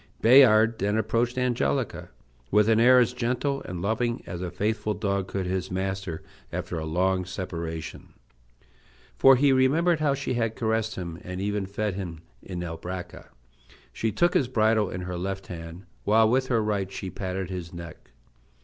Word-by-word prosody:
Bayard 115 -2 +6
then 105 +2 +1
approached 115 +3 0
Angelica 120 - -1 0.4
with 105 +1 +4
an 110 0 +4
air 125 +2 +7
as 125 -1 +3
gentle 125 +3 -1
and 90 -1 -5
loving 120 +3 -1
as 90 0 -6
a 90 - -3
faithful 105 +3 -1
dog 100 -2 -1
could 95 -2 -3
his 95 0 -2
master 95 -2 -3 0.3
after 85 - -4
a 80 - -4
long 90 +3 +1
separation. 85 -4 -6 1.0
For 135 0 +7
he 140 +2 +4
remembered 155 +6 +3
how 145 -3 +2
she 140 -1 -3
had 115 -2 -1
caressed 110 -1 -1
him, 85 -2 -6
and 90 0 -6
even 100 0 -2
fed 105 +1 -2
him, 85 -4 -6 0.2
in 90 -2 -6
Albracca. 90 +2 -7 0.7
She 110 - -1
took 175 - +2
his 130 - +2
bridle 110 -4 +2
in 90 - -5
her 90 -1 -4
left 95 +1 -4
hand, 85 +1 -9 0.2
while 110 +1 +4
with 130 +3 +2
her 115 -4 +1
right 100 -3 -1
she 95 -1 -6
patted 95 -1 -4
his 90 -2 -5
neck. 85 -5 -10
100 Hz, 165 wpm, -26 LUFS, 90-115 Hz, 1.0 s, air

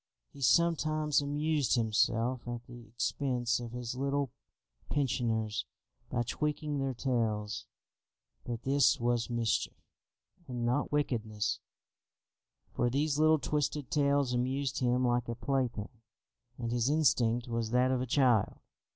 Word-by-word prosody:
He 140 - -12
sometimes 155 -1 +3
amused 145 0 +1
himself 115 +2 +1
at 120 0 -5
the 120 -1 -12
expense 120 +1 -1
of 120 -1 -6
his 120 -1 -4
little 140 0 -1 0.6
pensioners 115 -6 0 0.4
by 120 - 0
tweaking 150 +3 -2
their 135 -1 -1
tails; 110 -5 -1 0.8
but 120 -1 -5
this 140 +1 +3
was 120 0 0
mischief, 120 -2 0 0.7
and 120 -2 -3
not 125 +5 0
wickedness, 110 -8 -1 1.1
for 120 - +1
these 145 +3 0
little 155 0 +5
twisted 150 -2 -2
tails 140 -3 +2
amused 130 +2 -1
him 125 0 +2
like 120 -1 +1
a 115 - -2
plaything, 120 -3 -2 0.6
and 115 -2 -3
his 120 +1 +1
instinct 120 -6 +2
was 115 -1 -2
that 125 +2 +3
of 130 -1 +1
a 130 - -2
child. 120 -5 +3
125 Hz, 125 wpm, -31 LUFS, 120-140 Hz, 1.1 s, little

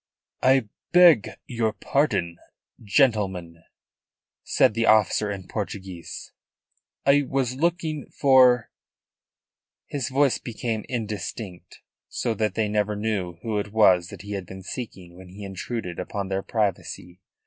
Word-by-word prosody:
"I 130 -3 +4 0.3
beg 175 - +7 0.2
your 115 -3 -1
pardon, 95 - 0 0.4
gentlemen," 100 - +1 0.8
said - - +3
the 115 +1 0
officer 105 0 +4
in 95 -3 -6
Portuguese, 95 -5 -6 0.7
"I 140 +1 +5
was 130 -2 -1
looking 160 -1 -1
for 130 -4 +4 0.6
" - - -69
His 140 -2 -2
voice 135 0 +2
became 115 -2 -4
indistinct, 105 -5 -5 0.3
so 115 - -1
that 110 -3 -1
they 110 -1 +1
never 105 0 0
knew 100 -5 -2
who 110 -3 -1
it 100 0 -5
was 95 -5 +4
that - - -10
he 105 - -8
had 95 -3 -4
been 95 +1 -9
seeking 95 -5 -7
when 90 0 -13
he 100 +3 -10
intruded 95 -1 -5
upon 95 +1 -4
their 95 0 -1
privacy. 95 -4 -3
105 Hz, 130 wpm, -25 LUFS, 95-125 Hz, 0.8 s, beg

